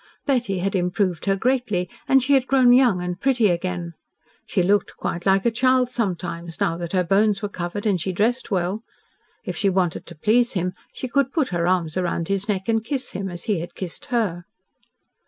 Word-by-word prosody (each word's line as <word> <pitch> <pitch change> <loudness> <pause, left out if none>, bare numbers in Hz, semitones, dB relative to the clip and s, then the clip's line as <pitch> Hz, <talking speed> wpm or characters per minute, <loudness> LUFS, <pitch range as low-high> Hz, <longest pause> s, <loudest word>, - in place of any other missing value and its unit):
Betty 245 -9 0
had 195 +2 -1
improved 180 -1 0
her 195 -1 +2
greatly, 220 -5 0 0.2
and 270 -1 +5
she 280 +2 +2
had 265 -1 +3
grown 255 -2 +5
young 240 -8 +4
and 180 +1 -4
pretty 245 -6 +3
again. 175 -1 -2 0.5
She 185 - +1
looked 200 +3 +1
quite 175 +2 -3
like 195 +2 +3
a 235 - +4
child 255 +1 +2
sometimes, 170 -7 -3
now 165 - +1
that 170 0 -5
her 185 -1 +3
bones 200 +3 +2
were 205 - -1
covered 180 +2 -5
and 195 -5 +1
she 190 - -1
dressed 230 +7 0
well. 190 +1 -1 0.6
If - - -4
she 200 - +1
wanted 180 -3 -1
to 170 - -10
please 235 +8 +2
him 180 -2 -1 0.2
she 255 - -5
could 270 +1 +1
put 295 -5 0
her 175 -1 0
arms 175 -3 0
round 175 -2 -1
his 195 +2 -1
neck 190 -2 -1
and 225 -1 +1
kiss 265 +2 -3
him, 195 0 -4
as 175 -1 -6
he 210 -7 0
had 170 +1 -7
kissed 180 -3 -6
her. 200 -8 -1
195 Hz, 205 wpm, -23 LUFS, 180-235 Hz, 0.6 s, and